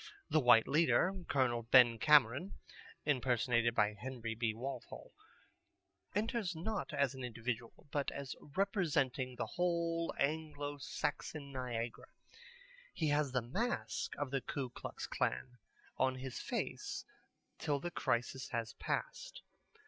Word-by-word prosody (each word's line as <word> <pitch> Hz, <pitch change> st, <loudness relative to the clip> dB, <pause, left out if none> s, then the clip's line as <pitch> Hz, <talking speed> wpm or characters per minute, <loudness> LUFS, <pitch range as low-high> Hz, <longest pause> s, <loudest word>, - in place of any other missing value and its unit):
The 155 Hz, -, +5 dB
white 120 Hz, -4 st, +6 dB
leader, 165 Hz, +5 st, +4 dB
Col. 125 Hz, -4 st, +2 dB
Ben 120 Hz, 0 st, +6 dB
Cameron 150 Hz, -, +5 dB, 0.5 s
(impersonated 120 Hz, -4 st, +2 dB
by 105 Hz, 0 st, +3 dB
Henry 115 Hz, +1 st, -5 dB
B. 115 Hz, 0 st, 0 dB
Walthall), 125 Hz, +3 st, -6 dB, 1.0 s
enters 215 Hz, -3 st, 0 dB
not 205 Hz, +6 st, -3 dB
as 140 Hz, -2 st, +1 dB
an 130 Hz, -1 st, -7 dB
individual, 120 Hz, 0 st, -4 dB
but 145 Hz, -1 st, 0 dB
as 140 Hz, -2 st, -5 dB
representing 145 Hz, -, 0 dB
the -, -, -2 dB
whole 170 Hz, -1 st, 0 dB
Anglo 145 Hz, -1 st, -1 dB
Saxon 140 Hz, +1 st, -3 dB
Niagara. 120 Hz, -3 st, -4 dB, 0.8 s
He 155 Hz, -3 st, 0 dB
has 145 Hz, -2 st, +2 dB
the 125 Hz, -2 st, +1 dB
mask 220 Hz, -, -2 dB
of 145 Hz, -2 st, -2 dB
the 135 Hz, -1 st, 0 dB
Ku 130 Hz, -2 st, -4 dB
Klux -, -, -6 dB
Klan 90 Hz, -, -2 dB, 0.4 s
on 130 Hz, 0 st, +2 dB
his 130 Hz, 0 st, -5 dB
face -, -, -3 dB, 0.5 s
till 145 Hz, -3 st, 0 dB
the 175 Hz, +4 st, -4 dB
crisis 125 Hz, -3 st, -1 dB
has 115 Hz, -1 st, -2 dB
passed. -, -, -4 dB
135 Hz, 125 wpm, -36 LUFS, 120-155 Hz, 1.0 s, white